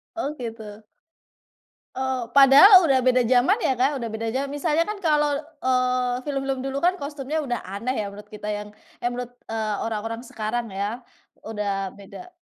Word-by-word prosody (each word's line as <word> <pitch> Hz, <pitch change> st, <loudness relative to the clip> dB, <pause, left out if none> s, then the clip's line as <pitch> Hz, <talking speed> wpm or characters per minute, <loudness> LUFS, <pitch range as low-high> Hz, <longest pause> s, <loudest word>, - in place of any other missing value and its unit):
Oh, 300 Hz, -3 st, -3 dB
gitu. 220 Hz, -3 st, -8 dB, 1.1 s
Oh, 260 Hz, -1 st, -2 dB
padahal 290 Hz, +7 st, +8 dB
udah 260 Hz, -2 st, +3 dB
beda 255 Hz, 0 st, +4 dB
jaman 245 Hz, +8 st, +4 dB
ya, 265 Hz, -, +1 dB
Kak, 270 Hz, +2 st, +1 dB
udah 230 Hz, -, -3 dB
beda 225 Hz, +1 st, -4 dB
jaman. 275 Hz, +2 st, -2 dB
Misalnya 310 Hz, +2 st, +1 dB
kan 420 Hz, +5 st, -2 dB
kalau, 295 Hz, -5 st, +1 dB, 0.2 s
eee, 255 Hz, -1 st, 0 dB
film-film 270 Hz, -2 st, -2 dB
dulu 270 Hz, +1 st, -3 dB
kan 360 Hz, +2 st, +2 dB
kostumnya 290 Hz, -1 st, -4 dB
udah 245 Hz, -3 st, -2 dB
aneh 200 Hz, +7 st, -4 dB
ya, 205 Hz, -, -4 dB
menurut 205 Hz, +1 st, -11 dB
kita 210 Hz, 0 st, -6 dB
yang 210 Hz, 0 st, -4 dB, 0.3 s
eh, 240 Hz, -, -1 dB
menurut, 245 Hz, 0 st, -5 dB, 0.2 s
eee, 220 Hz, -1 st, -2 dB
orang-orang 225 Hz, +1 st, -4 dB
sekarang 225 Hz, -1 st, -4 dB
ya, 210 Hz, +5 st, -4 dB, 0.4 s
udah 200 Hz, -3 st, -3 dB
beda. 355 Hz, -, -12 dB
250 Hz, 165 wpm, -24 LUFS, 220-280 Hz, 1.1 s, padahal